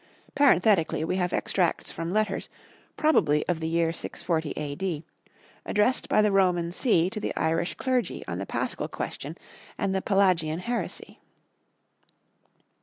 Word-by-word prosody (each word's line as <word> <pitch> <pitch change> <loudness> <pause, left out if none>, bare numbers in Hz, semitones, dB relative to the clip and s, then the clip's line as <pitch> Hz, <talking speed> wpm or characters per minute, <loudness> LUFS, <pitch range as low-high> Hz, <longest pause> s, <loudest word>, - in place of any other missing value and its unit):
Parenthetically 200 - +3
we 180 +3 -1
have 180 -1 0
extracts 180 -3 0
from 165 +1 -4
letters, 210 -1 0 0.5
probably 155 - +3
of 175 -3 0
the 160 - -2
year 165 0 +1
640 160 -2 -3
A.D., 150 +2 -3 0.6
addressed 210 +5 +1
by 215 - +4
the 210 - +3
Roman 180 -3 +2
see 180 -4 +3
to 215 - -4
the - - -3
Irish 165 +2 0
clergy 255 -2 -1
on - - -3
the - - -5
Paschal - - -2
question - - -5 0.4
and 195 -3 0
the 190 - 0
Pelagian 185 -6 +2
heresy. 240 +5 -4
180 Hz, 135 wpm, -27 LUFS, 165-210 Hz, 0.6 s, by